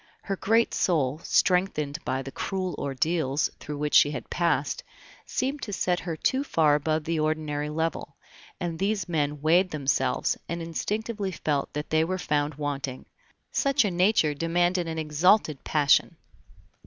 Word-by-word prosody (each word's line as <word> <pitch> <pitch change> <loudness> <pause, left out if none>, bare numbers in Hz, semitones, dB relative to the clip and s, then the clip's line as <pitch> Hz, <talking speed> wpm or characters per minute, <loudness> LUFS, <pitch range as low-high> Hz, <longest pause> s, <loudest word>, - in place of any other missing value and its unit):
Her 195 - -2
great 225 +4 +2
soul, 155 -4 +1
strengthened 170 -5 +1
by 130 +1 -2
the 135 - -7
cruel 185 +4 -3
ordeals 145 +1 0
through 150 -1 -6
which 150 0 -2
she 145 - +7
had 145 - -6
passed, 170 -4 0 0.4
seemed 270 +2 -2
to 205 - -5
set 180 -2 0
her 170 -3 -4
too 265 - +1
far 160 - +3
above 155 +1 0
the 165 +1 -1
ordinary 155 -1 -1
level, 160 -2 -3 0.4
and 170 -2 -3
these 200 -1 0
men 150 -4 -1
weighed 175 +4 +4
themselves, 145 -4 0
and 170 +1 -3
instinctively 205 +5 -3
felt 150 -4 -2
that 150 +1 -5
they 160 0 +4
were 185 +3 -1
found 150 -4 -1
wanting. 140 -3 -4 0.5
Such 275 -3 +2
a 200 - 0
nature 180 -3 +3
demanded 175 +3 +1
an 160 0 -4
exalted 155 +1 +2
passion. 145 -2 +3
160 Hz, 155 wpm, -26 LUFS, 150-185 Hz, 0.5 s, she